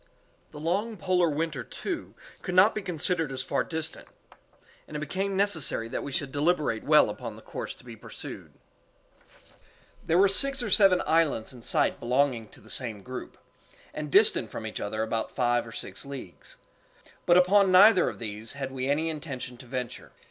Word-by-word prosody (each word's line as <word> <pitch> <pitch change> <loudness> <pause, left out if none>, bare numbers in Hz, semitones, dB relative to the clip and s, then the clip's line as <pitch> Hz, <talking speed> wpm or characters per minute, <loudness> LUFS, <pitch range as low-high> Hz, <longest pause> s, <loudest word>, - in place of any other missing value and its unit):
The 150 - -10
long 200 +8 -1
polar 185 -3 +2
winter, 150 -3 -2
too, - - -6 0.3
could 180 - -4
not 195 +4 +6
be 215 - -3
considered 170 -3 -2
as 130 -1 -4
far - - 0
distant, 160 -1 -5 0.8
and 150 - -6
it - - -4
became 190 +6 -2
necessary 170 - 0
that - - -3
we 140 - -6
should 135 0 -2
deliberate 145 -6 0
well - - +6
upon - - -6
the - - -13
course - - -6
to - - -18
be 120 -2 -9
pursued. 105 - -8 1.5
There 165 - +2
were 195 +2 +6
six 275 +6 +2
or 215 - -3
seven 195 -2 +6
islands 155 -7 +1
in 125 - -12
sight - - +1
belonging 125 -2 +1
to - - -18
the 110 - -17
same 110 -6 -3
group, 130 0 -8 0.6
and 150 -1 -5
distant 200 - +4
from 110 - -6
each 110 - -5
other 110 +2 -2
about 110 0 -3
five 120 -2 +1
or - - -9
six 95 -3 -5
leagues; 125 - -9 0.7
but 175 - +6
upon 190 +2 +5
neither 185 0 +7
of - - -8
these 110 +1 -6
had 135 -1 -5
we 130 0 -3
any 155 +3 +1
intention 140 -5 -5
to 125 - -13
venture. 125 -1 -5
145 Hz, 180 wpm, -27 LUFS, 125-180 Hz, 1.5 s, neither